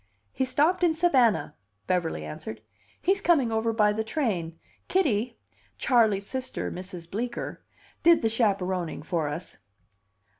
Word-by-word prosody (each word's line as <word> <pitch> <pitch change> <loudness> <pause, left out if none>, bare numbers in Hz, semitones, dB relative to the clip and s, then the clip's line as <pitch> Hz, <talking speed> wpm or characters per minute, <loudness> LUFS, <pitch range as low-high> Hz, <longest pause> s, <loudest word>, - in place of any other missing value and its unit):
"He 260 - -1
stopped 315 +8 +2
in 330 -2 +4
Savannah," 265 -10 +3 0.3
Beverly 165 - -1
answered. 110 +8 -7 0.4
"He's 390 +3 +1
coming 290 -11 +3
over 220 +1 +1
by 210 -2 +3
the 220 +1 -1
train. 195 - -2 0.3
Kitty 245 - +1 0.4
Charley's 220 -6 +3
sister, 260 +3 -4
Mrs. 180 -2 -8
Bleecker 235 +6 -4 0.4
did 335 -4 +5
the - - +4
chaperoning 190 -8 0
for 165 -2 -1
us. 150 +5 -6
220 Hz, 125 wpm, -27 LUFS, 180-260 Hz, 0.4 s, did